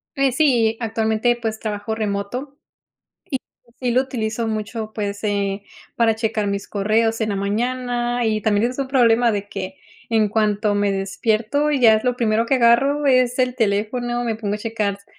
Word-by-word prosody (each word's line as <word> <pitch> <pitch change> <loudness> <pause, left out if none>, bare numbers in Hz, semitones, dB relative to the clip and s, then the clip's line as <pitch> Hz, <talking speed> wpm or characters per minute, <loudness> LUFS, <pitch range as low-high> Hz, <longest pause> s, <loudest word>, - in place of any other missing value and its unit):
Pues 275 -2 +1
sí, 240 -7 +3
actualmente, 225 +1 +1
pues, 220 -1 -3
trabajo 215 0 -3
remoto 220 +7 -4 1.1
y 235 - -25
sí - - +3
lo 255 +2 +3
utilizo 230 -3 -3
mucho, 220 0 -4
pues 205 0 -4
eh, 200 -1 -1 0.3
para 225 -2 +3
checar 220 -2 -1
mis 200 0 -3
correos 225 +3 +1
en 215 - -1
la 200 - -1
mañana 240 +3 -1
y 215 -1 0
también 215 +3 +2
es 255 - -10
un 270 - -1
problema 240 -3 +4
de 205 -1 -3
que, 195 +5 -6 0.3
en 220 -2 +3
cuanto 210 -1 +1
me 205 -1 +1
despierto 215 +8 0
y 280 -3 0
ya 225 -2 +7
es 215 +3 -1
lo 250 -1 +2
primero 225 -2 +1
que 265 +3 +2
agarro 275 +5 +3
es 255 -1 +3
el 255 0 +1
teléfono, 240 +3 0
me 230 -2 -1
pongo 210 -2 -3
a - - -4
checar 215 -2 -2
s 200 0 -18
225 Hz, 180 wpm, -21 LUFS, 210-245 Hz, 1.1 s, ya